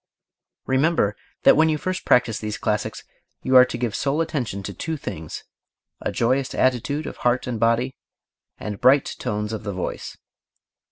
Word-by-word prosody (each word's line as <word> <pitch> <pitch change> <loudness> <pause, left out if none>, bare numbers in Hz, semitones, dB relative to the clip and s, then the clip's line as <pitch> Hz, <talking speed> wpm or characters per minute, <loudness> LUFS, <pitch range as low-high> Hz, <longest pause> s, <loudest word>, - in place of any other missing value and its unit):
REMEMBER 130 -6 +2 0.3
that - - +7
when 160 +1 +4
you 155 - +1
first 185 +4 -3
practise 120 -3 +3
these 105 -1 -4
classics 105 -1 -2 0.4
you 130 - +1
are 125 0 +10
to - - -5
give 120 -3 -2
sole 140 +2 0
attention 130 - -2
to - - -5
two 160 -1 -4
things: 80 - -6 0.6
a - - -2
joyous 130 +3 0
attitude 130 +4 +1
of - - -7
heart 125 +1 +1
and 120 -4 -3
body, 115 +3 +2 0.6
and 105 -2 -6
bright 135 +2 +4
tones 105 +1 -2
of 110 - -4
voice. 95 -3 -5
125 Hz, 160 wpm, -23 LUFS, 105-140 Hz, 0.6 s, are